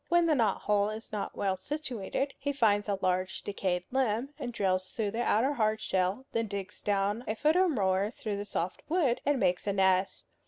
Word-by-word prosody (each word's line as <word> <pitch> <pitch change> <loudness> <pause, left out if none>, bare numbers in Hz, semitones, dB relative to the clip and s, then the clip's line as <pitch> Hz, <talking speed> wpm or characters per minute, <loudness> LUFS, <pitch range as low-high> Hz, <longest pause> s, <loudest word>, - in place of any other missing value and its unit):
When 345 0 +4
the 325 - +3
knot 230 -8 +2
hole 205 0 +2
is 215 +1 -7
not 210 -2 -4
well 195 -1 +1
situated, 270 +2 -3
he 285 +1 -1
finds 210 -6 +2
a 200 - +1
large 185 0 0
decayed 185 -3 -1
limb 250 -1 +1
and 245 - -3
drills 185 -4 0
through 215 -3 -1
the 230 +3 -2
outer 240 +5 +2
hard 220 -4 +1
shell, 190 +6 0
then 230 -1 0
digs 200 0 -6
down 205 +3 0
a 215 - -1
foot 305 +7 +2
or 370 0 +4
more 195 - +1
through 215 -3 -4
the 205 - -4
soft 180 -3 -3
wood, 285 -8 +2
and 285 -2 +3
makes 180 -1 +1
a 200 - +2
nest. 190 -1 +2
210 Hz, 205 wpm, -30 LUFS, 195-250 Hz, -, When